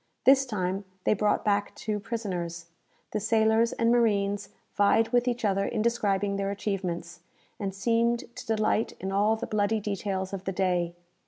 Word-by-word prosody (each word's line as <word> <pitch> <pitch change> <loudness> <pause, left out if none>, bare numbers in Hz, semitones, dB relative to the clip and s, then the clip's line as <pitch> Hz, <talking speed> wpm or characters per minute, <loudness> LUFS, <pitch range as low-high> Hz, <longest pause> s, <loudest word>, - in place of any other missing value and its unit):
This 270 0 +6
time 190 -3 -2 0.2
they - - +3
brought 210 0 +1
back 205 -1 +1
two 210 -1 -3
prisoners. 180 -7 -4 0.5
The 215 - -1
sailors 220 +2 +3
and 230 0 +2
marines 205 -4 +2 0.2
vied 220 +2 +3
with 245 +1 +2
each 240 -2 0
other 195 -1 +2
in 215 +1 -1
describing 205 -4 +1
their 195 0 -1
achievements, 180 -4 -3 0.4
and 195 -2 -2
seemed 235 +4 +1
to - - -9
delight 220 0 +1
in 190 +1 -3
all 205 +3 +3
the 220 - -4
bloody 215 +1 +1
details 195 -2 -3
of 195 -1 -5
the 190 - -2
day. 180 -2 0
205 Hz, 165 wpm, -28 LUFS, 195-225 Hz, 0.5 s, This